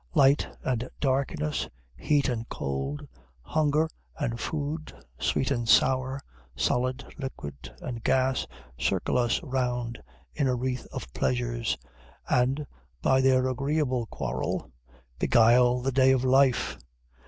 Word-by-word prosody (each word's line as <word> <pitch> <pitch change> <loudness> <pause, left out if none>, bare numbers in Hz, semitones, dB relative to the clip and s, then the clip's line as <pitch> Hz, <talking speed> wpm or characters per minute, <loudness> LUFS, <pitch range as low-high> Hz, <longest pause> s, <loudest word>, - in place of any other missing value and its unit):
Light 135 +2 +5
and 125 -1 -1
darkness, 130 - 0 0.3
heat 145 - +2
and 120 -2 -3
cold, 70 +1 -3 0.4
hunger 155 - +2 0.3
and 115 -6 -2
food, 155 +3 -3 0.3
sweet 130 - +1
and 120 -4 -1
sour, 130 +1 +4 0.4
solid, 125 - 0
liquid, 75 - -7
and 120 -2 -5
gas, 130 0 +2 0.3
circle - - 0
us 120 -1 +2
round 125 -4 -2 0.3
in 140 -3 +1
a 125 - +2
wreath 125 0 -3
of 65 - -7
pleasures, - - 0 0.5
and, 130 +4 +2 0.4
by 130 0 +4
their 130 -1 +4
agreeable 130 -2 0
quarrel, 65 - -3 0.5
beguile 120 +1 +5
the 135 +2 0
day 130 0 +5
of 130 -1 +1
life. 130 0 +3
130 Hz, 120 wpm, -28 LUFS, 120-135 Hz, 0.5 s, Light